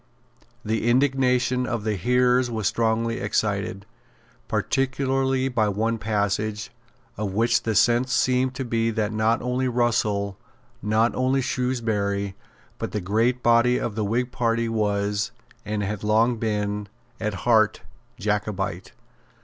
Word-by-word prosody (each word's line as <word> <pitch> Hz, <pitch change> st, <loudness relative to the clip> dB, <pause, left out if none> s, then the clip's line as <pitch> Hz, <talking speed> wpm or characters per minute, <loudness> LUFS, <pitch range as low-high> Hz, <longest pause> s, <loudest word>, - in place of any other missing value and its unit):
The 110 Hz, +2 st, 0 dB
indignation 125 Hz, -1 st, +2 dB
of 115 Hz, -3 st, -2 dB
the 110 Hz, -1 st, 0 dB
hearers 125 Hz, +5 st, +2 dB
was 110 Hz, -3 st, -3 dB
strongly 115 Hz, +3 st, 0 dB
excited, 100 Hz, -1 st, -1 dB, 0.6 s
particularly 135 Hz, 0 st, 0 dB
by 115 Hz, -5 st, +1 dB
one 110 Hz, +3 st, -1 dB
passage, 105 Hz, 0 st, -1 dB, 0.5 s
of 105 Hz, -2 st, -3 dB
which 115 Hz, +3 st, +2 dB
the 110 Hz, -1 st, -2 dB
sense 120 Hz, +3 st, +3 dB
seemed 130 Hz, 0 st, +2 dB
to 130 Hz, -, -3 dB
be 115 Hz, -1 st, 0 dB
that 110 Hz, -1 st, -1 dB
not 110 Hz, +3 st, +1 dB
only 125 Hz, +1 st, 0 dB
Russell, 105 Hz, -5 st, 0 dB, 0.4 s
not 110 Hz, +3 st, +2 dB
only 130 Hz, +1 st, +1 dB
Shrewsbury, 110 Hz, -6 st, -1 dB, 0.5 s
but -, -, -4 dB
the 105 Hz, -, 0 dB
great 115 Hz, +6 st, 0 dB
body 120 Hz, +1 st, +4 dB
of 115 Hz, -, -3 dB
the 110 Hz, 0 st, -2 dB
Whig 120 Hz, +4 st, -1 dB
party 115 Hz, -1 st, 0 dB
was, 105 Hz, -2 st, 0 dB, 0.3 s
and 105 Hz, -1 st, -2 dB
had 105 Hz, +1 st, -4 dB
long 115 Hz, +3 st, +3 dB
been, 105 Hz, -2 st, -2 dB, 0.3 s
at 105 Hz, -2 st, -2 dB
heart 110 Hz, -3 st, +3 dB, 0.3 s
Jacobite. 100 Hz, -2 st, -2 dB
115 Hz, 130 wpm, -24 LUFS, 105-125 Hz, 0.6 s, body